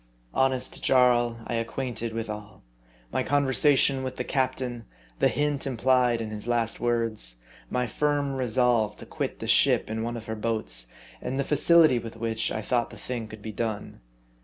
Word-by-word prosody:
Honest 130 Hz, -1 st, 0 dB
Jarl, 120 Hz, -2 st, +4 dB
I -, -, -4 dB
acquainted 115 Hz, 0 st, -2 dB
with 115 Hz, 0 st, -3 dB
all: 105 Hz, -1 st, -8 dB, 0.5 s
my -, -, 0 dB
con 145 Hz, 0 st, +2 dB
versation 135 Hz, 0 st, +3 dB
with 130 Hz, -1 st, -4 dB
the -, -, -2 dB
captain, 130 Hz, -3 st, -1 dB, 0.3 s
the -, -, +5 dB
hint 145 Hz, -2 st, 0 dB
implied 125 Hz, -2 st, +2 dB
in 110 Hz, -1 st, -4 dB
his 105 Hz, +1 st, -6 dB
last 120 Hz, -2 st, 0 dB
words, 115 Hz, -, -1 dB, 0.3 s
my 125 Hz, 0 st, 0 dB
firm 145 Hz, +3 st, 0 dB
resolve 125 Hz, -4 st, +1 dB
to -, -, -10 dB
quit -, -, -4 dB
the -, -, -6 dB
ship -, -, +3 dB
in 110 Hz, 0 st, -2 dB
one 120 Hz, +1 st, -3 dB
of 115 Hz, -, -8 dB
her 110 Hz, -, -4 dB
boats, 110 Hz, -, -2 dB, 0.3 s
and 135 Hz, +2 st, -3 dB
the -, -, +2 dB
facility 155 Hz, -1 st, +5 dB
with 115 Hz, -1 st, -8 dB
which 115 Hz, -1 st, -1 dB
I 110 Hz, -, -3 dB
thought 120 Hz, 0 st, 0 dB
the -, -, -11 dB
thing 120 Hz, -3 st, -5 dB
could 110 Hz, -1 st, -11 dB
be 110 Hz, -, -5 dB
done. 110 Hz, -, -4 dB
120 Hz, 180 wpm, -27 LUFS, 110-130 Hz, 0.5 s, the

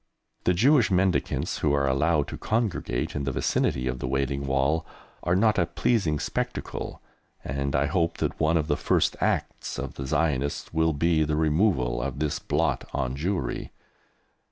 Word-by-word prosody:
The 90 Hz, -, +3 dB
Jewish 130 Hz, -, +4 dB
mendicants 95 Hz, -1 st, +1 dB
who 75 Hz, -2 st, +2 dB
are 70 Hz, -1 st, +2 dB
allowed 75 Hz, +3 st, +2 dB
to -, -, -6 dB
congregate 110 Hz, -3 st, -1 dB
in 70 Hz, -, -1 dB
the 70 Hz, -, -1 dB
vicinity 65 Hz, 0 st, 0 dB
of 65 Hz, 0 st, -2 dB
the 60 Hz, -, -3 dB
Wailing 70 Hz, +1 st, -1 dB
Wall 70 Hz, +4 st, +1 dB, 0.4 s
are 90 Hz, +1 st, +1 dB
not 105 Hz, +2 st, +3 dB
a 85 Hz, -, +2 dB
pleasing 95 Hz, -11 st, +1 dB
spectacle, -, -, -4 dB, 0.4 s
and 70 Hz, +1 st, -2 dB
I 70 Hz, +1 st, +3 dB
hope 85 Hz, +2 st, 0 dB
that -, -, -2 dB
one 80 Hz, +1 st, +3 dB
of 80 Hz, -, 0 dB
the 75 Hz, -1 st, +1 dB
first -, -, +1 dB
acts -, -, -1 dB
of 70 Hz, -1 st, -4 dB
the 70 Hz, -, -6 dB
Zionists 70 Hz, -1 st, -1 dB
will 80 Hz, 0 st, +2 dB
be 80 Hz, +2 st, +2 dB
the 75 Hz, 0 st, 0 dB
removal 75 Hz, -, +2 dB
of 70 Hz, 0 st, -3 dB
this 75 Hz, 0 st, -1 dB
blot 75 Hz, 0 st, -1 dB
on 65 Hz, +1 st, -1 dB
Jewry. 80 Hz, -3 st, -2 dB
75 Hz, 170 wpm, -26 LUFS, 70-85 Hz, 0.4 s, Jewish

